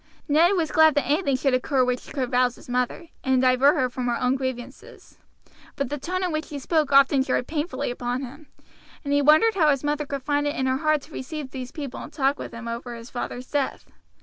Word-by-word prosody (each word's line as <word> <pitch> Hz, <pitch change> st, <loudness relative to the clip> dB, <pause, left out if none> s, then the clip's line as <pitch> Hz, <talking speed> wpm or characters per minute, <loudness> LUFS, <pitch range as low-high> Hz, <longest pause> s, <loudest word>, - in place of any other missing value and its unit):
Ned 330 Hz, +5 st, +4 dB
was 330 Hz, -5 st, 0 dB
glad 315 Hz, -1 st, +5 dB
that 290 Hz, -3 st, +1 dB
anything 285 Hz, +1 st, +1 dB
should 270 Hz, 0 st, +1 dB
occur 255 Hz, 0 st, +2 dB
which 250 Hz, 0 st, -3 dB
could 260 Hz, -4 st, -2 dB
rouse 250 Hz, -1 st, +2 dB
his -, -, -16 dB
mother, 250 Hz, +7 st, -2 dB
and 265 Hz, -1 st, +2 dB
divert 255 Hz, +3 st, +4 dB
her 255 Hz, -, +1 dB
from 250 Hz, 0 st, -4 dB
her 240 Hz, -, 0 dB
own 250 Hz, 0 st, +2 dB
grievances; 260 Hz, -, -7 dB, 0.6 s
but 275 Hz, -3 st, -2 dB
the 295 Hz, -, -3 dB
tone 370 Hz, +6 st, -3 dB
in 360 Hz, -, 0 dB
which 310 Hz, 0 st, -2 dB
she 295 Hz, -, -7 dB
spoke 300 Hz, +1 st, 0 dB
often 275 Hz, 0 st, +5 dB
jarred 260 Hz, -1 st, 0 dB
painfully 305 Hz, -2 st, -3 dB
upon 245 Hz, +2 st, -3 dB
him, 280 Hz, +4 st, -10 dB, 0.6 s
and 285 Hz, -1 st, -1 dB
he 285 Hz, -, +3 dB
wondered 310 Hz, +10 st, +5 dB
how 320 Hz, -6 st, +3 dB
his 275 Hz, -2 st, +1 dB
mother 295 Hz, 0 st, -1 dB
could 280 Hz, -2 st, -4 dB
find 290 Hz, +1 st, 0 dB
it 290 Hz, -, -2 dB
in 260 Hz, -, -1 dB
her 260 Hz, 0 st, +1 dB
heart 310 Hz, -1 st, +1 dB
to 320 Hz, -, -16 dB
receive 280 Hz, 0 st, -6 dB
these 255 Hz, -2 st, -6 dB
people 285 Hz, -5 st, -6 dB
and -, -, -9 dB
to -, -, -18 dB
talk 275 Hz, 0 st, +1 dB
over 235 Hz, +1 st, -6 dB
his 230 Hz, +1 st, -11 dB
father's 245 Hz, 0 st, -5 dB
death. 285 Hz, -2 st, -1 dB
275 Hz, 230 wpm, -24 LUFS, 255-300 Hz, 0.6 s, glad